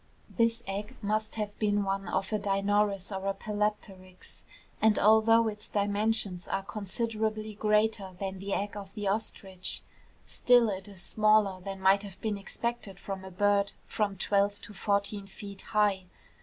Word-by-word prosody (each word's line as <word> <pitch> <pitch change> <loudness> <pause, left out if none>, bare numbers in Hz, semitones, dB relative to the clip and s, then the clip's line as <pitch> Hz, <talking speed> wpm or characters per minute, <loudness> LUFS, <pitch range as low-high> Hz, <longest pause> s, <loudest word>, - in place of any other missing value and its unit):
This 230 0 +2
egg 200 +2 -4
must 215 +1 -1
have 210 -2 -4
been 205 -1 +2
one 195 -1 -2
of 190 +4 -1
a 215 - +2
Dinornis 200 0 +1
or 190 +1 -3
a 195 - 0
Palapteryx, 205 -3 -4 0.4
and 220 -1 +5
although 220 +2 +5
its 210 -1 -4
dimensions 205 -2 0
are 195 - -1
considerably 215 +1 -2
greater 210 -2 +1
than 195 -1 -4
the 200 +1 -5
egg 200 +1 -1
of 200 -1 -8
the 205 -1 -3
ostrich, 195 -2 -3 0.4
still 245 -3 +4
it 190 0 -5
is 195 -3 -10
smaller 215 -2 +3
than 195 +1 -6
might 190 +1 +5
have 195 -2 -10
been 210 -2 -2
expected 205 -1 -4
from 195 -1 -5
a 190 - -8
bird 200 +2 +2
from 200 -2 -1
twelve 200 +1 +1
to 210 - -8
fourteen 200 0 -1
feet 200 0 -9
high. 205 -3 +1
205 Hz, 155 wpm, -30 LUFS, 195-215 Hz, 0.4 s, and